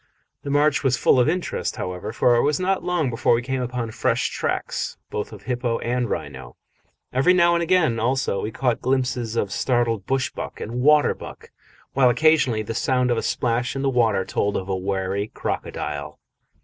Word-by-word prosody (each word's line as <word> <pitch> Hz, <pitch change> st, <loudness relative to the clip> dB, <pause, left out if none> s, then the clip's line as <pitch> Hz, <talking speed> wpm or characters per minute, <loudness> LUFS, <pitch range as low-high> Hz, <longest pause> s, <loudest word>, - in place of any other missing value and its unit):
The 140 Hz, -, -6 dB
march 145 Hz, +1 st, +2 dB
was 130 Hz, -2 st, +2 dB
full 130 Hz, -, +4 dB
of 125 Hz, -, +4 dB
interest, 180 Hz, +2 st, -2 dB
however, 90 Hz, +3 st, -5 dB
for 120 Hz, +1 st, +3 dB
it 120 Hz, -, +3 dB
was 145 Hz, 0 st, +1 dB
not 185 Hz, 0 st, 0 dB
long 175 Hz, -7 st, 0 dB
before 115 Hz, 0 st, +2 dB
we 120 Hz, -, -2 dB
came 130 Hz, 0 st, -2 dB
upon 125 Hz, -2 st, -3 dB
fresh -, -, 0 dB
tracks -, -, -3 dB
both 105 Hz, -, -4 dB
of 105 Hz, -2 st, -11 dB
hippo 120 Hz, -2 st, -1 dB
and 120 Hz, -1 st, -1 dB
rhino. 65 Hz, -4 st, -5 dB, 0.6 s
Every 135 Hz, +8 st, +4 dB
now 170 Hz, -1 st, +5 dB
and 170 Hz, -, +1 dB
again, 165 Hz, -9 st, +2 dB
also, 125 Hz, -3 st, 0 dB
we 105 Hz, -, -3 dB
caught 125 Hz, +1 st, -1 dB
glimpses 125 Hz, -3 st, -1 dB
of 100 Hz, -4 st, -1 dB
startled 115 Hz, -3 st, 0 dB
bush 135 Hz, -1 st, 0 dB
buck -, -, -7 dB
and 120 Hz, +3 st, -4 dB
water 150 Hz, +2 st, +5 dB
buck, -, -, -11 dB, 0.4 s
while 130 Hz, -2 st, +4 dB
occasionally 130 Hz, -4 st, +3 dB
the 115 Hz, -, -5 dB
sound 125 Hz, +1 st, +1 dB
of 120 Hz, -, +1 dB
a -, -, -2 dB
splash 120 Hz, +1 st, -1 dB
in 135 Hz, -, -2 dB
the 135 Hz, -, +2 dB
water 110 Hz, -6 st, +2 dB
told 100 Hz, +1 st, -1 dB
of 95 Hz, -, -5 dB
a 95 Hz, -, -1 dB
wary 95 Hz, +1 st, -2 dB
crocodile. -, -, -4 dB
125 Hz, 190 wpm, -23 LUFS, 110-135 Hz, 0.6 s, now